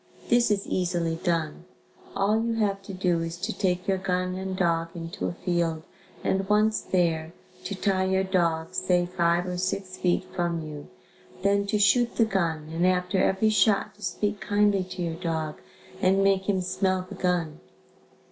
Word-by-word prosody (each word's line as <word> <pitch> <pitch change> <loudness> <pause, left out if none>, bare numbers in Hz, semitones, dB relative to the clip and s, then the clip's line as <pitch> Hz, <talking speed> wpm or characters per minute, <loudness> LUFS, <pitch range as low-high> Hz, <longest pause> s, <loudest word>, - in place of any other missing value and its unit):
This 240 -1 +4
is 200 -2 0
easily 175 -2 -1
done. 170 -2 -2 0.5
All 210 +3 +2
you 230 0 -1
have 200 -3 0
to 195 - -9
do 180 -2 +1
is 165 +1 -4
to 200 +6 -3
take 180 -2 0
your 190 -1 +1
gun 185 -1 -1
and 190 0 -4
dog 165 -2 +1
into 165 +2 -4
a - - -3
field 170 -3 0 0.4
and 190 0 0
once 215 +1 +3
there 165 -3 0 0.3
to 200 - -3
tie 190 -1 +1
your 190 0 +2
dog 170 -3 0
say 180 -1 +2
five 175 -1 +1
or 180 -1 -3
six 185 0 -2
feet 180 -1 +1
from 170 -2 -1
you, 150 -1 -8 0.6
then 200 0 +2
to 210 - +1
shoot 235 +4 +3
the 230 - +4
gun 165 -7 -1
and 170 +2 +2
after 185 +1 +1
every 215 +3 +2
shot 215 -1 +3
to 210 - -23
speak 205 +2 -2
kindly 205 -2 +2
to 180 0 -5
your 165 -1 -2
dog 160 -3 -3 0.4
and 195 +1 +3
make 195 0 +2
him 190 -2 +2
smell 185 0 0
the - - -9
gun. 175 -4 -1
185 Hz, 175 wpm, -26 LUFS, 170-195 Hz, 0.6 s, This